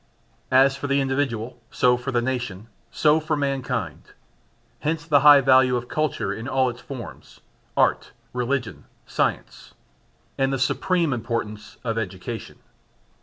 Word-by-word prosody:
As 135 Hz, +1 st, +5 dB
for 145 Hz, -, -5 dB
the 140 Hz, 0 st, +2 dB
individual, 130 Hz, -3 st, -2 dB
so 125 Hz, 0 st, +3 dB
for 125 Hz, +2 st, -4 dB
the 120 Hz, -2 st, +1 dB
nation, 120 Hz, -6 st, -3 dB, 0.2 s
so 155 Hz, +1 st, +3 dB
for 155 Hz, 0 st, -1 dB
mankind. 135 Hz, -2 st, -3 dB, 0.7 s
Hence 155 Hz, 0 st, -2 dB
the 150 Hz, -3 st, +4 dB
high 145 Hz, 0 st, +8 dB
value 130 Hz, -1 st, +5 dB
of 120 Hz, 0 st, -3 dB
culture 155 Hz, -10 st, -1 dB
in 110 Hz, +4 st, -6 dB
all 130 Hz, -2 st, +1 dB
its 120 Hz, -, -13 dB
forms 130 Hz, -4 st, -10 dB, 0.4 s
(art, -, -, +2 dB, 0.2 s
religion, 125 Hz, -1 st, -2 dB, 0.2 s
science) -, -, -3 dB, 0.6 s
and 135 Hz, 0 st, +2 dB
the 135 Hz, -, 0 dB
supreme 165 Hz, +4 st, +1 dB
importance 115 Hz, -3 st, -4 dB
of 115 Hz, -2 st, -1 dB
education. 105 Hz, +2 st, -6 dB
130 Hz, 135 wpm, -24 LUFS, 120-140 Hz, 0.7 s, high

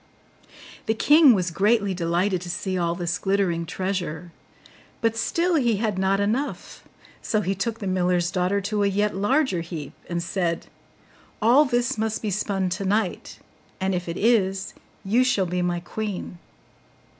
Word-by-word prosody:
The 220 Hz, -, +1 dB
king 295 Hz, +1 st, +6 dB
was 180 Hz, -2 st, -1 dB
greatly 205 Hz, +2 st, +2 dB
delighted 175 Hz, +2 st, 0 dB
to 180 Hz, -, -7 dB
see 190 Hz, +1 st, -3 dB
all 170 Hz, -1 st, 0 dB
this 175 Hz, -1 st, -2 dB
glittering 190 Hz, -4 st, 0 dB
treasure; 180 Hz, -3 st, -3 dB, 0.7 s
but 225 Hz, -1 st, +1 dB
still 335 Hz, +10 st, 0 dB
he 240 Hz, -6 st, +2 dB
had 210 Hz, -2 st, -1 dB
not 190 Hz, +1 st, +2 dB
enough: 225 Hz, +8 st, -2 dB, 0.4 s
so 215 Hz, -, 0 dB
he 195 Hz, -1 st, -1 dB
took 220 Hz, +4 st, -2 dB
the 205 Hz, -, -6 dB
miller's 180 Hz, -2 st, +1 dB
daughter 185 Hz, +2 st, 0 dB
to 210 Hz, +1 st, -1 dB
a 200 Hz, -, +3 dB
yet 205 Hz, +1 st, 0 dB
larger 205 Hz, -, +1 dB
heap, 165 Hz, -3 st, -7 dB, 0.2 s
and 170 Hz, -1 st, -2 dB
said, 170 Hz, -2 st, -1 dB, 0.7 s
'All 245 Hz, +7 st, +5 dB
this 240 Hz, -3 st, 0 dB
must 220 Hz, 0 st, -2 dB
be 210 Hz, -, -1 dB
spun 195 Hz, -1 st, -1 dB
tonight; 195 Hz, +1 st, -2 dB, 0.4 s
and 190 Hz, 0 st, 0 dB
if 175 Hz, -1 st, -3 dB
it 170 Hz, -, -4 dB
is, 195 Hz, -4 st, +1 dB, 0.3 s
you 230 Hz, +6 st, +3 dB
shall 245 Hz, -7 st, +2 dB
be 180 Hz, +1 st, -2 dB
my 175 Hz, -1 st, 0 dB
queen. 190 Hz, -1 st, -5 dB
195 Hz, 155 wpm, -24 LUFS, 180-220 Hz, 0.7 s, king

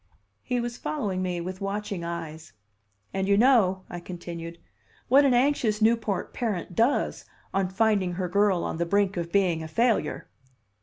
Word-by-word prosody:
He 250 Hz, -1 st, -1 dB
was 240 Hz, 0 st, -4 dB
following 205 Hz, -12 st, -2 dB
me 180 Hz, -2 st, -2 dB
with 185 Hz, +3 st, -6 dB
watching 200 Hz, -2 st, -3 dB
eyes. 165 Hz, -2 st, -6 dB, 0.6 s
"And 190 Hz, 0 st, -1 dB
you 200 Hz, 0 st, +4 dB
know," 210 Hz, -6 st, +4 dB
I 175 Hz, -, -6 dB
continued, 170 Hz, -1 st, -7 dB, 0.5 s
"what 275 Hz, +3 st, +6 dB
an 260 Hz, -3 st, +4 dB
anxious 245 Hz, -5 st, +2 dB
Newport 220 Hz, -3 st, +1 dB
parent 205 Hz, -7 st, -3 dB
does 235 Hz, +8 st, +1 dB, 0.3 s
on 195 Hz, -1 st, +1 dB
finding 195 Hz, -2 st, +1 dB
her 180 Hz, +1 st, -2 dB
girl 200 Hz, -1 st, +2 dB
on -, -, -3 dB
the 170 Hz, -, 0 dB
brink 200 Hz, +1 st, +2 dB
of 170 Hz, -1 st, -4 dB
being 180 Hz, -4 st, +2 dB
a 160 Hz, -, -5 dB
failure." 225 Hz, -1 st, 0 dB
195 Hz, 160 wpm, -26 LUFS, 175-225 Hz, 0.6 s, what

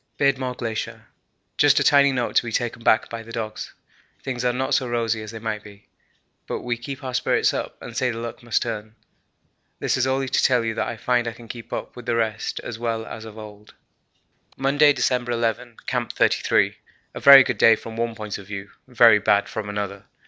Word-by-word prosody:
'Beardmore 130 Hz, -3 st, 0 dB
Glacier. 115 Hz, -2 st, -4 dB, 0.5 s
Just 145 Hz, 0 st, +5 dB
a -, -, +2 dB
tiny 140 Hz, -1 st, +5 dB
note 125 Hz, -2 st, -2 dB
to -, -, +5 dB
be 120 Hz, -, -5 dB
taken 120 Hz, +1 st, -2 dB
back 110 Hz, -, +3 dB
by 115 Hz, -1 st, -6 dB
the 115 Hz, 0 st, -12 dB
dogs. 110 Hz, -2 st, -5 dB, 0.5 s
Things 125 Hz, -2 st, -3 dB
are 125 Hz, -, +2 dB
not 130 Hz, +2 st, -2 dB
so 130 Hz, -, +2 dB
rosy 115 Hz, -2 st, -1 dB
as 110 Hz, -, -8 dB
they 115 Hz, -, -7 dB
might 110 Hz, -1 st, -4 dB
be, 105 Hz, -1 st, -16 dB, 0.6 s
but -, -, -4 dB
we 120 Hz, -1 st, -2 dB
keep 135 Hz, +4 st, -8 dB
our 130 Hz, -1 st, -5 dB
spirits -, -, +2 dB
up -, -, -5 dB
and 115 Hz, -, -10 dB
say 125 Hz, +1 st, +1 dB
the 115 Hz, -, -4 dB
luck 115 Hz, +2 st, -6 dB
must 120 Hz, -1 st, 0 dB
turn. 110 Hz, -2 st, -6 dB, 0.8 s
This -, -, 0 dB
is 130 Hz, 0 st, +1 dB
only 135 Hz, 0 st, 0 dB
to 130 Hz, -, +1 dB
tell 125 Hz, -3 st, +3 dB
you 110 Hz, -, -1 dB
that -, -, -2 dB
I 115 Hz, -, -5 dB
find 120 Hz, +1 st, 0 dB
I 115 Hz, -, -3 dB
can 115 Hz, 0 st, -14 dB
keep 120 Hz, 0 st, -9 dB
up -, -, -5 dB
with 125 Hz, 0 st, -11 dB
the 120 Hz, -, +1 dB
rest 110 Hz, -1 st, -2 dB
as 115 Hz, -2 st, -7 dB
well 115 Hz, -1 st, -2 dB
as 110 Hz, -, -8 dB
of 110 Hz, -1 st, -11 dB
old.' 105 Hz, -1 st, -12 dB, 0.8 s
Monday, 145 Hz, +2 st, +4 dB
December 125 Hz, -3 st, 0 dB
11. 115 Hz, 0 st, -2 dB
Camp -, -, -2 dB
33. -, -, +2 dB, 0.4 s
A -, -, -6 dB
very 140 Hz, -1 st, +10 dB
good 120 Hz, -4 st, -3 dB
day 115 Hz, -, +7 dB
from 110 Hz, +1 st, -9 dB
one 115 Hz, 0 st, -2 dB
point 105 Hz, -2 st, -6 dB
of 100 Hz, -, -12 dB
view, 100 Hz, -1 st, -7 dB, 0.2 s
very 120 Hz, -4 st, +6 dB
bad 100 Hz, 0 st, +2 dB
from 105 Hz, -2 st, -5 dB
another. 100 Hz, -1 st, -4 dB
115 Hz, 215 wpm, -23 LUFS, 110-125 Hz, 0.8 s, very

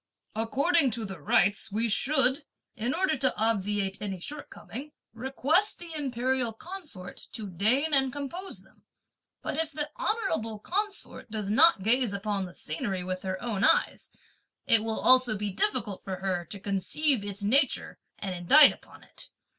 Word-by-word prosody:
According 275 Hz, +7 st, +2 dB
to 225 Hz, -, -4 dB
the 190 Hz, -4 st, -7 dB
rites, 200 Hz, +8 st, +2 dB
we 225 Hz, +3 st, 0 dB
should, 270 Hz, +4 st, +2 dB, 0.3 s
in 235 Hz, +4 st, -2 dB
order 340 Hz, +1 st, +1 dB
to 260 Hz, 0 st, 0 dB
obviate 205 Hz, -3 st, 0 dB
any 195 Hz, -3 st, -4 dB
shortcoming, 290 Hz, -, -8 dB, 0.2 s
request 270 Hz, -, +2 dB
the 340 Hz, -2 st, -9 dB
imperial 260 Hz, -4 st, -1 dB
consort 300 Hz, -, -8 dB
to 220 Hz, -, -5 dB
deign 250 Hz, -, +1 dB
and 270 Hz, -2 st, +3 dB
compose 290 Hz, +8 st, -6 dB
them; -, -, -26 dB, 0.6 s
but -, -, -3 dB
if 320 Hz, -1 st, -2 dB
the 295 Hz, 0 st, -3 dB
honourable 225 Hz, -, -1 dB
consort 405 Hz, -, -3 dB
does 210 Hz, -2 st, -3 dB
not 285 Hz, -, +5 dB
gaze 235 Hz, 0 st, +4 dB
upon 200 Hz, -1 st, -2 dB
the 180 Hz, -, -11 dB
scenery 180 Hz, +4 st, -3 dB
with 185 Hz, 0 st, -4 dB
her 185 Hz, -1 st, -4 dB
own 215 Hz, -4 st, -2 dB
eyes, 485 Hz, -, +2 dB, 0.5 s
it 225 Hz, -1 st, +4 dB
will 225 Hz, -1 st, -2 dB
also 255 Hz, -4 st, +4 dB
be 205 Hz, 0 st, -2 dB
difficult 210 Hz, -, -1 dB
for 190 Hz, -1 st, -4 dB
her 185 Hz, -2 st, -2 dB
to 200 Hz, +5 st, -9 dB
conceive 205 Hz, +7 st, 0 dB
its 205 Hz, 0 st, -5 dB
nature 265 Hz, +6 st, +1 dB, 0.2 s
and 195 Hz, -2 st, -4 dB
indite 180 Hz, -, +7 dB
upon -, -, -17 dB
it! -, -, -11 dB
225 Hz, 155 wpm, -28 LUFS, 200-290 Hz, 0.6 s, indite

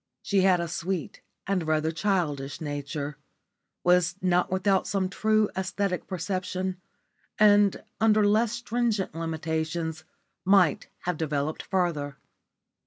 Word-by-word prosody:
She 200 Hz, -2 st, +2 dB
had 185 Hz, -1 st, +4 dB
a 170 Hz, -, -2 dB
sweet 170 Hz, 0 st, -4 dB, 0.2 s
and 185 Hz, -5 st, -1 dB
rather 155 Hz, 0 st, +1 dB
childish 160 Hz, -7 st, -1 dB
nature, 145 Hz, -1 st, -4 dB, 0.7 s
was 180 Hz, 0 st, +3 dB
not 180 Hz, -1 st, +2 dB
without 190 Hz, +1 st, +2 dB
some 190 Hz, -1 st, 0 dB
true 215 Hz, +2 st, +2 dB
æsthetic 190 Hz, 0 st, -2 dB
perception, 185 Hz, 0 st, -3 dB, 0.6 s
and 205 Hz, -2 st, +5 dB, 0.2 s
under 215 Hz, -1 st, +4 dB
less 215 Hz, +2 st, +3 dB
stringent 235 Hz, -5 st, -1 dB
limitations 160 Hz, 0 st, -3 dB, 0.4 s
might 190 Hz, -5 st, +4 dB
have 180 Hz, -2 st, -2 dB
developed 150 Hz, -1 st, -2 dB
further. 155 Hz, -7 st, -1 dB
180 Hz, 110 wpm, -27 LUFS, 160-195 Hz, 0.7 s, and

